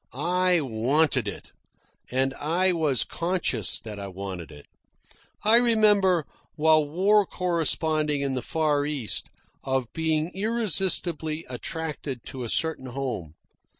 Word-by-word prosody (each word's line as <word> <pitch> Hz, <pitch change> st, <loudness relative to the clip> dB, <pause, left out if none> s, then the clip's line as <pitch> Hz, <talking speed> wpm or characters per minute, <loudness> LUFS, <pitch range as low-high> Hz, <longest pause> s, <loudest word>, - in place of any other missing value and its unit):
I 180 Hz, +5 st, +2 dB
WANTED 135 Hz, +5 st, +1 dB
it, -, -, -7 dB, 0.6 s
and 130 Hz, +1 st, 0 dB
I 175 Hz, +5 st, +2 dB
was 155 Hz, -7 st, +1 dB
CONSCIOUS 170 Hz, -, -1 dB
that 105 Hz, -2 st, -8 dB
I 100 Hz, -, -5 dB
wanted 95 Hz, -3 st, -7 dB
it. 75 Hz, -1 st, -13 dB, 0.8 s
I 220 Hz, +2 st, +7 dB
remember, 210 Hz, -8 st, +4 dB, 0.3 s
while 155 Hz, 0 st, +4 dB
war 200 Hz, +6 st, +4 dB
corresponding 160 Hz, -5 st, 0 dB
in 140 Hz, -1 st, -1 dB
the 130 Hz, -, -2 dB
Far 150 Hz, -2 st, 0 dB
East, 140 Hz, -7 st, -2 dB, 0.3 s
of 130 Hz, -3 st, -2 dB
being 160 Hz, 0 st, 0 dB
irresistibly 185 Hz, -7 st, 0 dB
attracted 140 Hz, 0 st, -5 dB
to 130 Hz, -, -7 dB
a 115 Hz, -, -4 dB
certain 160 Hz, -3 st, 0 dB
home. 120 Hz, -, -4 dB
155 Hz, 120 wpm, -26 LUFS, 130-180 Hz, 0.8 s, I